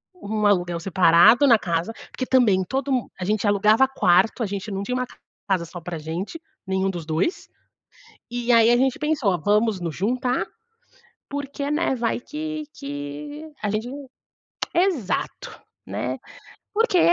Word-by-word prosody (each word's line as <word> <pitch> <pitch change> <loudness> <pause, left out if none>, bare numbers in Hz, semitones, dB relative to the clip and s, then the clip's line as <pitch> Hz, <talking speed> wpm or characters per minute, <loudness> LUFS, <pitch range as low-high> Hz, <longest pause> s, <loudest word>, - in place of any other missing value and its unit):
um 215 - -2
aluguel 175 -4 +1
separado 185 - +5
na 230 -4 +6
casa, 170 +5 -2 0.2
porque 255 - -3
também 225 -8 +4
todo 270 +1 -2
mu 250 -4 0
a 185 - -3
gente 210 +2 0
alugava 210 +5 +4
quarto, 225 -2 +3
a - - +1
gente 200 +1 -5
não 195 0 -3
tinha 250 +5 -2
uma 255 - 0 0.4
casa 185 -3 +2
só 175 +2 -9
pra 170 0 -5
gente, 175 - -5 0.3
nenhum 190 0 0
dos 175 -4 -5
2. 160 - -1 0.8
E 240 0 -3
aí 230 0 +6
a 240 - +5
gente 260 0 +1
pensou: 275 - +1
"Vamos 210 0 +2
nos 170 -3 -3
juntar 245 +5 0 0.8
porque, 280 0 -4
né, 300 -2 +1
vai 235 -1 -1
que 310 +2 -5
que 145 - -7
a 210 - 0
gente" 215 +3 -2 0.9
Exato, 345 - -1 0.2
né? - - -3 0.6
Porque 430 -4 +3
215 Hz, 150 wpm, -23 LUFS, 185-265 Hz, 0.9 s, na